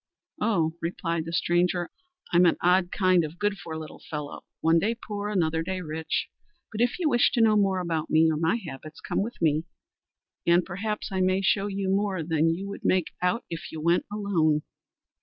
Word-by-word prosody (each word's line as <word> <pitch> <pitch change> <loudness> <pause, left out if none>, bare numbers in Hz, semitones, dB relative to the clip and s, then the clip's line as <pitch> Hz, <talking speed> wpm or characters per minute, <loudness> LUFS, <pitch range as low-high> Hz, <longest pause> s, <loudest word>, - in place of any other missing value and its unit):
"Oh!" 170 -8 +1
replied 165 -1 -2
the 165 - -5
stranger, 175 0 +1 0.4
"I'm 175 +1 +6
an - - +2
odd 180 0 +3
kind 185 -3 +3
of 155 +2 -6
good 205 0 -1
for 160 -2 -6
little 155 -1 -9
fellow, 150 -3 -5 0.2
one 165 +1 +4
day 220 +7 0
poor, 210 -2 -5
another 160 -5 +1
day 185 +3 -3
rich, 160 -1 -2 0.4
but 220 0 -3
if 240 0 +2
you 350 -3 0
wish 240 -5 +4
to 240 - +2
know 220 -1 +5
more 195 -2 +2
about 165 -3 -2
me 160 +1 +5
or 155 - -1
my 165 +6 +2
habits, 155 - -8
come - - -2
with 230 +4 -5
me 155 -1 +2 0.8
and 170 +1 +4
perhaps 210 +4 -4
I 190 -1 0
may 185 +1 +2
show 195 +2 +2
you 195 -1 -3
more 195 -2 0
than 160 0 +2
you 180 +4 -2
would 200 - -7
make 185 -3 +2
out 180 +7 0
if 165 0 -7
you 160 - -6
went 170 +3 +2
alone." 165 -8 +1
180 Hz, 195 wpm, -26 LUFS, 160-200 Hz, 0.8 s, I'm